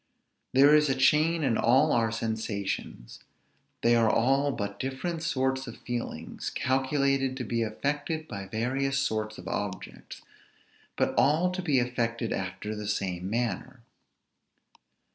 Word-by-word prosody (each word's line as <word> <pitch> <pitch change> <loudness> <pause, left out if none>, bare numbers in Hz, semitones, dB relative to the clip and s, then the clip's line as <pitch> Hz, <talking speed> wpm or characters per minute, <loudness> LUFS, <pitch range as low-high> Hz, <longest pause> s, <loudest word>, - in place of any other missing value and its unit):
There 140 +3 +6
is 150 -1 +5
a 135 - +2
chain 155 +5 +3
in 125 -5 +1
all 135 +6 +4
our 115 -2 +2
sensations; 110 - -4 0.6
they 120 0 +5
are 115 -1 +4
all 135 +6 +2
but 100 -4 -4
different 160 +6 -3
sorts 130 -5 0
of 115 - -8
feelings 120 -1 -5
calculated 135 0 0
to 130 - -3
be 115 0 -1
affected 145 +8 -2
by 100 -1 -6
various 135 +6 -1
sorts 110 -5 -1
of 90 - -10
objects, 95 -2 -5 0.7
but - - +1
all 160 +6 +3
to 185 +1 -3
be 150 -7 +1
affected 120 -2 -1
after 95 +3 -4
the 105 -1 -5
same 95 -3 -2
manner. 120 +2 -3
125 Hz, 135 wpm, -28 LUFS, 110-140 Hz, 0.7 s, There